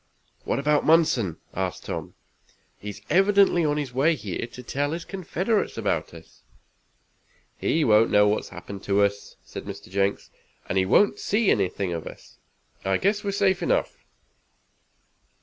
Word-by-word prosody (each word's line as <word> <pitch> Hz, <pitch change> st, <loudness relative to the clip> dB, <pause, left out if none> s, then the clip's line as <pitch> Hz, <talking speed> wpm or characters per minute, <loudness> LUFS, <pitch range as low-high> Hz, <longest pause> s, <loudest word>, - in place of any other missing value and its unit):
"What -, -, 0 dB
about 145 Hz, +1 st, +2 dB
Munson?" 145 Hz, -, +3 dB, 0.2 s
asked 95 Hz, -1 st, -3 dB
Tom. -, -, -5 dB, 0.6 s
"He 105 Hz, -, -7 dB
is 105 Hz, 0 st, -9 dB
evidently 195 Hz, -2 st, +4 dB
on 150 Hz, -1 st, +1 dB
his 140 Hz, -4 st, -3 dB
way 150 Hz, +6 st, +3 dB
here 105 Hz, -, -5 dB
to 125 Hz, +1 st, -11 dB
tell 145 Hz, +5 st, -2 dB
his 170 Hz, 0 st, -5 dB
confederates 195 Hz, +3 st, -2 dB
about -, -, -1 dB
us." -, -, -16 dB, 1.1 s
"He 160 Hz, -, 0 dB
won't 110 Hz, 0 st, +5 dB
know 105 Hz, 0 st, +5 dB
what 105 Hz, -, +2 dB
has -, -, -11 dB
happened 100 Hz, -1 st, -9 dB
to 100 Hz, 0 st, +3 dB
us," 100 Hz, 0 st, -2 dB
said -, -, -9 dB
Mr. -, -, -9 dB
Jenks, 100 Hz, 0 st, -1 dB, 0.4 s
"and 95 Hz, -, +1 dB
he 95 Hz, -, +1 dB
won't 200 Hz, -, +4 dB
see 210 Hz, 0 st, +2 dB
anything 95 Hz, -1 st, 0 dB
of 85 Hz, -2 st, -5 dB
us. -, -, -13 dB, 0.4 s
I 95 Hz, 0 st, +1 dB
guess 205 Hz, +2 st, 0 dB
we're 200 Hz, -, -1 dB
safe 195 Hz, -1 st, +1 dB
enough." -, -, -1 dB
130 Hz, 160 wpm, -25 LUFS, -, 1.1 s, won't